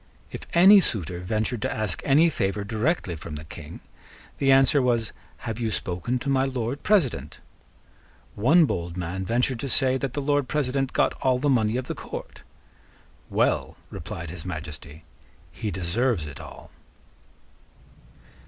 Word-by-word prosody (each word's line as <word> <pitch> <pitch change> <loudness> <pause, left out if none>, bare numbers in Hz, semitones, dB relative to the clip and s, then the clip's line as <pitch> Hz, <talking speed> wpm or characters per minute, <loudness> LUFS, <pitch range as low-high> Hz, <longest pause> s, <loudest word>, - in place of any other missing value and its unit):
If - - -8
any 195 +4 +9
suitor 90 - -1
ventured 110 +5 -2
to - - -1
ask 110 -3 -2
any 150 +5 +5
favour 100 -5 -1
directly 110 - -1
from 80 0 -7
the 75 - -7
King, 80 0 -10 0.6
the 135 -1 +4
answer 135 +1 +5
was, 120 -3 +1 0.3
"Have 115 -1 -3
you 115 -2 0
spoken 95 +4 -2
to 125 - -6
my 135 -1 +3
Lord 130 -1 -2
President?" 130 - +1 0.9
One 155 +11 +5
bold 85 - -3
man 90 +2 -3
ventured 125 +1 +1
to 135 - -4
say 130 0 +2
that 135 -2 -3
the 145 - -2
Lord 145 -1 +1
President 135 -1 0
got - - +2
all 130 -1 +3
the 145 +3 0
money 110 -2 +2
of 130 - -3
the - - -3
court. - - -8 0.9
"Well," - - 0
replied 85 -1 -6
His 85 -2 -8
Majesty 80 -3 -7 0.5
"he 105 +5 -4
deserves 95 +2 0
it 70 -2 -9
all." - - -11
115 Hz, 155 wpm, -25 LUFS, 90-135 Hz, 0.9 s, any